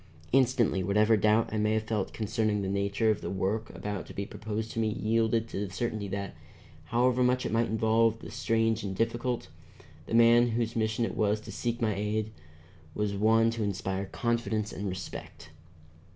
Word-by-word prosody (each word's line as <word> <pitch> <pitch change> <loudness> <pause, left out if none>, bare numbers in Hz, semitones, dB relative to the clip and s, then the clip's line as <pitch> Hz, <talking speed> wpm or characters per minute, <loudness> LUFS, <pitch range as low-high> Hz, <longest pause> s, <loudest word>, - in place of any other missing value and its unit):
Instantly 125 -6 +3
whatever 105 +4 +3
doubt 110 +2 +2
I 110 - 0
may 105 +1 +2
have 110 0 +1
felt 105 -2 -2
concerning 110 -1 -1
the - - -2
nature 100 +3 +1
of 105 - -2
the - - -4
work 100 +4 -1
about 105 -2 -5
to - - -11
be 100 - -3
proposed 110 +2 -5
to - - -3
me 110 - +2
yielded 115 +1 +1
to 100 - -3
the - - -12
certainty 110 0 -3
that, 100 0 -4 0.5
however 125 +6 +2
much 125 0 +2
it - - -2
might 115 +1 +2
involve 110 +1 +2
of - - -18
the - - -9
strange 115 0 +1
and 95 -2 -4
difficult, 120 +3 -1 0.6
the - - -1
man 115 +1 +6
whose 115 0 -1
mission 110 +1 0
it - - -4
was 105 0 +1
to - - -9
seek 120 -1 -2
my 110 -2 +2
aid 105 +2 -2 0.6
was 105 -1 -1
one 110 +3 +3
to 115 0 -4
inspire 95 -1 -2
confidence 110 -2 -1
and 100 +1 -3
respect. 90 0 -8
110 Hz, 190 wpm, -29 LUFS, 105-115 Hz, 0.6 s, man